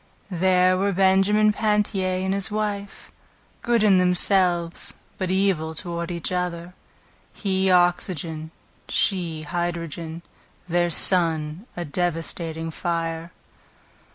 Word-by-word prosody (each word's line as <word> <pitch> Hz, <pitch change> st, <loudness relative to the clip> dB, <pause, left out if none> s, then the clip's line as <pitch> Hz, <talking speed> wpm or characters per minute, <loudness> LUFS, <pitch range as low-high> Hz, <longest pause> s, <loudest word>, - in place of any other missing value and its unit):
There 185 Hz, +1 st, +3 dB
were 200 Hz, +1 st, +1 dB
Benjamin 195 Hz, +3 st, +4 dB
Pantier 205 Hz, -3 st, 0 dB
and 190 Hz, -, 0 dB
his 200 Hz, +1 st, +2 dB
wife, 210 Hz, -1 st, -4 dB, 0.5 s
Good 235 Hz, -2 st, +2 dB
in 195 Hz, -3 st, +5 dB
themselves, 180 Hz, -1 st, +1 dB, 0.2 s
but 185 Hz, -2 st, -1 dB
evil 185 Hz, -4 st, +1 dB
toward 170 Hz, +1 st, -4 dB
each 170 Hz, -1 st, -3 dB
other; 180 Hz, -1 st, -3 dB, 0.6 s
He 190 Hz, -2 st, 0 dB
oxygen, 175 Hz, -3 st, +1 dB, 0.4 s
she 170 Hz, -5 st, 0 dB
hydrogen, 170 Hz, 0 st, -4 dB, 0.4 s
Their 175 Hz, 0 st, +1 dB
son, 165 Hz, +1 st, +2 dB
a 175 Hz, -, -3 dB
devastating 165 Hz, 0 st, -2 dB
fire. 165 Hz, 0 st, -3 dB
180 Hz, 100 wpm, -23 LUFS, 170-190 Hz, 0.6 s, in